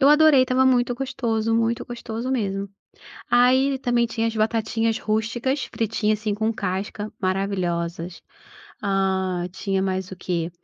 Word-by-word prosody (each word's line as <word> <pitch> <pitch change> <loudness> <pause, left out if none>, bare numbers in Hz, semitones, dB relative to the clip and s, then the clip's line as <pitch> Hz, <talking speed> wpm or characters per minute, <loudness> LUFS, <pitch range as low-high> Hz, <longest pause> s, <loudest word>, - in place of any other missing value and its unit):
Eu 275 - +6
adorei 300 -3 +7
estava 255 +1 +2
muito 245 -1 +3
gostoso, 230 -4 -1
muito 230 0 +1
gostoso 235 0 -5
mesmo. 200 -5 -1 0.6
Aí, 260 +2 +4
também 240 -2 +2
tinha 225 0 -1
as 225 - -3
batatinhas 225 +1 0
rústicas, 230 +5 -1
fritinha, 220 -1 0
assim, 215 -1 -2
com 220 +2 0
casca, 205 +2 -3
maravilhosas. 180 -3 -2 0.6
Ah, 190 -2 0
tinha 195 0 -2
mais 190 -1 -2
o 190 - -7
quê? 175 -2 -2
220 Hz, 135 wpm, -23 LUFS, 195-245 Hz, 0.6 s, adorei